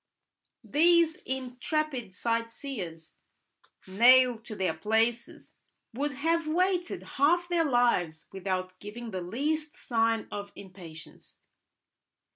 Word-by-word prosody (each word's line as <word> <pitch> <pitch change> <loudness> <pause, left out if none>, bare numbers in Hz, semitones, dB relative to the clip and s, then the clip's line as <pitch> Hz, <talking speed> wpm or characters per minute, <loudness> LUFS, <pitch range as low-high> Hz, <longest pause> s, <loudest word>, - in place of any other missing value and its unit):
These 335 +1 +3
intrepid 255 -2 -3
sightseers, 230 - -4 0.7
nailed 240 +4 +5
to 220 - -7
their 185 -4 0
places, 225 +7 -1 0.4
would 285 +4 -2
have 325 +4 0
waited 355 +2 0
half 340 +6 +2
their 345 -2 +1
lives 235 - +1
without 185 -1 -3
giving 225 +3 -8
the 185 -2 -4
least 295 - -2
sign 225 -2 0
of 205 0 -6
impatience. 180 -4 -13
240 Hz, 95 wpm, -29 LUFS, 200-295 Hz, 0.7 s, nailed